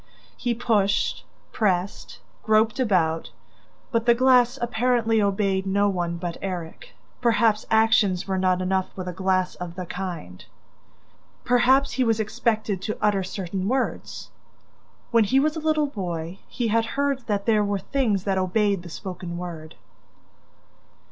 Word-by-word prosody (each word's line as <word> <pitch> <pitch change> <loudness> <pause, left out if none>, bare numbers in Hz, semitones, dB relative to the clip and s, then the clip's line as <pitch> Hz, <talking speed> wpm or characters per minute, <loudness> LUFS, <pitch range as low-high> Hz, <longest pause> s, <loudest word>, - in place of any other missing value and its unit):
He 235 - -2
pushed, 215 -4 +1 0.3
pressed, 190 -3 -1 0.2
groped 220 +2 +2
about, 165 - +1 0.6
but 230 -1 0
the 235 - +6
glass 250 0 +4
apparently 235 -1 +1
obeyed 195 -1 0
no 200 +1 +2
one 175 -3 -2
but 170 0 -5
Erik... 185 - -6 0.3
Perhaps 225 -3 +2
actions 220 -5 +3
were 190 -1 -1
not 185 -1 +1
enough 190 0 0
with 185 -1 -6
a 180 - -4
glass 185 0 0
of 175 -1 -7
the 185 -1 -5
kind? 175 - -6 1.0
Perhaps 255 +3 +4
he 260 - +1
was 225 -2 +1
expected 215 -2 -1
to 215 - -3
utter 205 -2 +2
certain 185 0 -4
words? 260 +3 -2 0.8
When 230 -2 +4
he 265 +7 +3
was 305 +3 +1
a - - -3
little 310 -1 +1
boy, 180 - -5
he 235 -3 -2
had 225 +1 +2
heard 280 -2 0
that 205 -2 -1
there 215 -2 +3
were 200 0 0
things 210 -2 0
that 195 -2 0
obeyed 200 +1 +1
the 175 - -10
spoken 180 0 -6
word! 165 -3 -7
205 Hz, 145 wpm, -24 LUFS, 185-235 Hz, 1.0 s, the